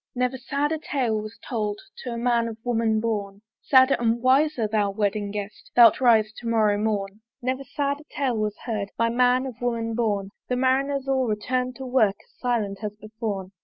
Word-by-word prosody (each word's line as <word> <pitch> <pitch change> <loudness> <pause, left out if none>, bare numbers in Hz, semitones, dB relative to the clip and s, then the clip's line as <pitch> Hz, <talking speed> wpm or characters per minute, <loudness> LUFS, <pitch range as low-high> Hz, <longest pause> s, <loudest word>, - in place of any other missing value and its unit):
Never 250 +1 0
sadder 290 +4 -1
tale 245 -8 -1
was 215 +1 -9
told 210 -4 -2 0.2
To 250 - -5
a 235 - -4
man 235 -1 +1
of 225 -1 -6
woman 225 -2 +1
born: 205 -3 -3 0.2
Sadder 260 0 +5
and 235 0 +1
wiser 260 -1 +3
thou 210 -1 +1
wedding 205 0 -1
guest! 205 0 -7
Thou'lt 235 +1 +7
rise 220 -3 +4
to 235 - -7
morrow 215 -3 +2
morn. 205 -1 -2 0.2
Never 260 +1 -2
sadder 285 +2 -3
tale 265 -4 -1
was 215 -1 -2
heard 210 -4 -2
By 230 0 +2
a - - -2
man 250 +2 +3
of 245 -3 -8
woman 230 -2 -1
born: 205 -4 -1 0.2
The 250 - +1
Marineres 265 +2 +1
all 265 -2 +1
return'd 250 +4 -1
to 265 - -7
work 235 -6 +3
As - - -34
silent 220 -5 -1
as 210 -1 -3
beforne. 215 -3 -5
230 Hz, 190 wpm, -25 LUFS, 210-255 Hz, 0.2 s, Thou'lt